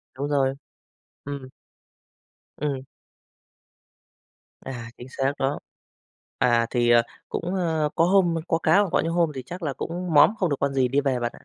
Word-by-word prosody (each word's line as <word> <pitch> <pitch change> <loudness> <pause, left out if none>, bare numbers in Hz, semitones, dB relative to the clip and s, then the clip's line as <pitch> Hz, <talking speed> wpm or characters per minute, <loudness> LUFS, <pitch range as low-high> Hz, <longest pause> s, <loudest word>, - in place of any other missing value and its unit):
Đúng 140 +2 -3
rồi, 135 -2 +2 0.7
ừm. 140 -2 -6 1.1
Ừm. 140 -3 -2 1.8
À, 120 -3 -7
chính 125 - -10
xác 135 +1 0
đó. 135 +2 0 0.8
À, 120 -1 +3
thì, 120 -1 +2
ờ, 120 0 +6 0.3
cũng, 175 +3 -3
ơ, 160 -4 0
có 165 - +3
hôm 180 -2 +3
có 165 - +2
cá 180 - +3
còn 190 - -2
có - - +3
những 165 - -2
hôm 170 -2 +2
thì 130 - -5
chắc 180 +1 -8
là 145 - -1
cũng 175 +4 -4
móm, 150 +9 +7
không 180 - +1
được 140 - +1
con 140 0 0
gì, 130 -2 +2
đi 135 +3 +2
về 135 -3 0
bạn - - -5
ạ. 120 - 0
145 Hz, 180 wpm, -25 LUFS, 130-165 Hz, 1.8 s, móm